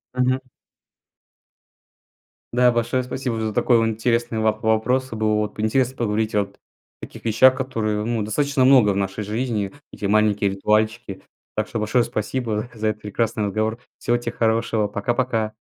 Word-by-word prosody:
Мгм. 125 +1 +2 2.1
Да, 125 0 +5
большое 120 +2 0
спасибо 125 -2 -3
за 110 -1 -2
такой 120 +3 +3
вон 115 0 +2
интересный 115 +1 0
воп 110 0 0
вопрос. 120 +4 +1
Э, - - -4
было 110 -1 +1
вот 105 0 -2
интересно 125 +4 +1
поговорить 110 -1 -1
вот 100 -1 -1
о - - -37 0.5
таких - - -14
вещах, 130 +4 +5
которые, 110 -5 -2
ну, 115 -1 -1
достаточно 140 +6 0
много 130 -6 +6
в - - -2
нашей 100 +1 -2
жизни. 105 -1 -2 0.2
Такие 100 - -4
маленькие 105 -1 +2
ритуальчики. 105 +1 0 0.3
Так - - -1
что 115 - -4
большое 110 +3 +2
спасибо 110 0 -3
за 110 -1 -2
этот 110 0 -2
прекрасный 110 +1 -1
разговор. 110 +3 -1 0.2
Всего 120 - +1
те 120 - -4
хорошего, 110 -1 +1
пока-пока! 110 +1 -1
110 Hz, 155 wpm, -22 LUFS, 105-120 Hz, 2.1 s, много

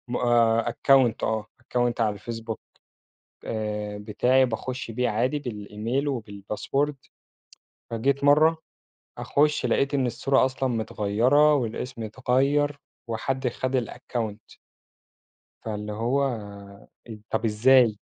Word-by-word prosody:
م 120 - -2 0.5
account 125 0 +3
آه 110 -1 -1 0.2
account 120 -1 -1
على 110 -2 +2
الفيسبوك، 115 +1 -6 0.9
آآ، 105 -1 -3
بتاعي 120 +5 +2
باخُش 125 +1 -4
بيه 125 +2 0
عادي 125 +7 0
بالemail 115 +1 -3
وبالpassword، 115 +4 -2 1.0
فجيت 135 +5 0
مرَّة 155 +3 +5 0.6
أخُش 150 -1 +1
لقيت 135 +4 +1
إن 135 -2 +2
الصورة 130 +3 +2
أصلًا 130 0 -1
متغيِّرة 120 +6 +2
والاسم 120 -1 -3
اتغيَّر 135 +5 +1 0.3
وحد 130 +3 -2
خد 130 +2 -2
الaccount. 110 -2 -6 1.1
فاللي 105 -1 -4
هو 125 +3 0 0.9
طَب 110 +1 -1
إزاي؟ 115 +1 +4
120 Hz, 100 wpm, -25 LUFS, 110-135 Hz, 1.1 s, مرَّة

